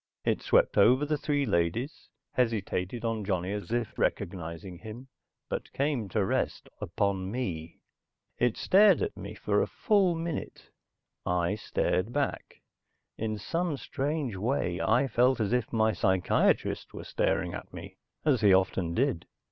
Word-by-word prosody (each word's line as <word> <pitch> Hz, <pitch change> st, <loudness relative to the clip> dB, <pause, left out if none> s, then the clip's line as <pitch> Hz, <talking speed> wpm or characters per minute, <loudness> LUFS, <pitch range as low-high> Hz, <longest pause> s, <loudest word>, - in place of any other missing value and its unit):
It -, -, +1 dB
swept -, -, +3 dB
over 130 Hz, +5 st, +5 dB
the 150 Hz, +1 st, 0 dB
three 145 Hz, -1 st, 0 dB
ladies, 105 Hz, -, -1 dB, 0.2 s
hesitated 115 Hz, -2 st, -1 dB
on 115 Hz, -2 st, -1 dB
Johnny 95 Hz, -1 st, -1 dB
as 105 Hz, +1 st, -5 dB
if 120 Hz, -2 st, -2 dB
recognizing 85 Hz, +1 st, -3 dB
him, 115 Hz, +6 st, -9 dB, 0.4 s
but -, -, -4 dB
came 135 Hz, -6 st, -1 dB
to 100 Hz, +1 st, +1 dB
rest -, -, -1 dB
upon 95 Hz, +1 st, -1 dB
me. 90 Hz, -9 st, -4 dB, 0.6 s
It 120 Hz, -2 st, +2 dB
stared 205 Hz, -, +5 dB
at 430 Hz, -, -3 dB
me -, -, -8 dB
for -, -, +1 dB
a -, -, 0 dB
full 195 Hz, -6 st, +2 dB
minute. 165 Hz, -1 st, -5 dB, 0.5 s
I 90 Hz, +1 st, +1 dB
stared 100 Hz, 0 st, -1 dB
back. 140 Hz, +2 st, -3 dB, 0.6 s
In 110 Hz, -1 st, -2 dB
some 165 Hz, -, -2 dB
strange 140 Hz, -4 st, -2 dB
way 95 Hz, -4 st, -1 dB
I 120 Hz, +5 st, +3 dB
felt 125 Hz, +1 st, +2 dB
as 110 Hz, +1 st, 0 dB
if 125 Hz, -3 st, 0 dB
my 110 Hz, -1 st, +2 dB
psychiatrist 95 Hz, -2 st, +1 dB
were -, -, -6 dB
staring -, -, 0 dB
at -, -, -7 dB
me, -, -, -10 dB, 0.3 s
as 140 Hz, -7 st, +3 dB
he 105 Hz, -2 st, +6 dB
often 95 Hz, -2 st, 0 dB
did. 125 Hz, -9 st, 0 dB
110 Hz, 150 wpm, -29 LUFS, 95-140 Hz, 0.6 s, he